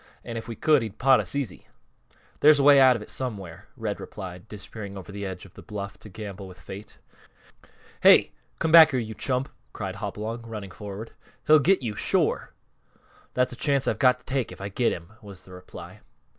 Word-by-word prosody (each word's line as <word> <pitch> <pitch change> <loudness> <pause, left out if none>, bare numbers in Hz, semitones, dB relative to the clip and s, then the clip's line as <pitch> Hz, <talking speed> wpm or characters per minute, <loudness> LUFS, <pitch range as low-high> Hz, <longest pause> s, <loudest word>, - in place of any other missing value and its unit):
And 115 - -7
if 115 0 -6
we 115 - -6
could, 150 +1 +3
he'd 110 -3 -6
pot 135 0 +5
us - - -3
easy." 130 -10 -4 0.7
"There's 150 0 +7
a 140 - +2
way 140 0 +8
out 130 -2 +7
of 110 - -5
it - - -14
somewhere," 100 -8 -5
Red 110 -4 -3
replied, 90 -1 -9
disappearing 100 -1 -8
over 95 +1 -9
the 100 0 -5
edge 95 -1 -7
of 95 - -16
the - - -12
bluff 100 -1 -7
to 105 - -12
gamble 100 -1 -8
with 90 -1 -13
Fate. 100 +2 -10 1.0
"Hey! - - +7 0.3
Come 160 - -1
back 160 -1 +10
here, 130 -4 0
you 110 -2 -5
chump!" 130 +2 -1 0.3
cried - - -5
Hopalong, 110 +3 -5
running 105 -4 -7
forward. 105 +3 -8 0.3
"He'll 155 +1 +7
get 180 0 +3
you, 110 -3 -3
shore!" - - 0 0.8
"That's 125 0 +1
a - - -5
chance 140 0 +1
I've - - 0
got 125 -2 +5
to - - -27
take 130 -3 -2
if - - -11
I 100 +1 -5
get 120 +4 +1
him," 85 +5 -7
was 100 -3 -12
the 95 - -16
reply. 90 0 -11
110 Hz, 205 wpm, -26 LUFS, 100-130 Hz, 1.0 s, back